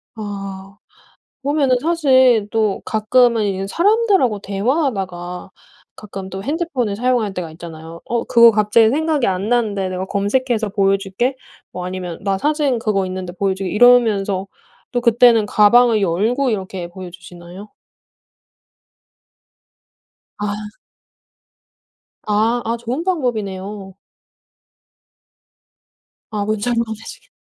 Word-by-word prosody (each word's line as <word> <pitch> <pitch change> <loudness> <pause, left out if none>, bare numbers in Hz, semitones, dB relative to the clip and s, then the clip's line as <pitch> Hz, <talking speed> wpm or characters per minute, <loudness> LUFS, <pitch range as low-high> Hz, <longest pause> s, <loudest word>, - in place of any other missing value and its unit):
아. 195 -2 -7 0.6
보면은 280 -2 +1
사실 260 -9 +3
또 215 -3 0
가끔은 230 +1 +2
이제 195 -1 -2
사람들하고 390 - +2
대화하다가 195 - -3 0.4
가끔 195 -2 -8
또 190 0 -6
핸드폰을 280 - -2
사용할 235 -3 0
때가 175 -3 -5
있잖아요. 165 0 -10
"어, 235 0 -1
그거 235 0 +6
갑자기 215 +1 +3
생각이 305 0 0
안 195 +3 -1
나는데 210 -6 0
내가 185 0 -4
검색해서 220 +3 -1
보여줄게." 195 +5 0 0.4
뭐 180 0 -6
아니면 180 -2 -5
"나 195 -1 0
사진 290 -2 0
그거 210 -4 0
있는데 185 -1 -6
보여줄게." 190 0 -2
이러면서 210 -5 +3 0.5
또 245 - 0
그때는 235 -2 +5
가방을 220 +2 +4
열고 220 +9 +1
이렇게 190 -4 -4
보여주시나요? 175 +1 -11 2.7
아. 205 0 -2 1.7
아, 220 +3 +1
아. 230 +1 -1
좋은 240 +7 -4
방법이네요. 205 - -3 2.4
아. 210 -2 -2
문자로 225 +3 0
보내주겠 225 - -10
210 Hz, 255 characters per minute, -19 LUFS, 195-245 Hz, 2.7 s, 그거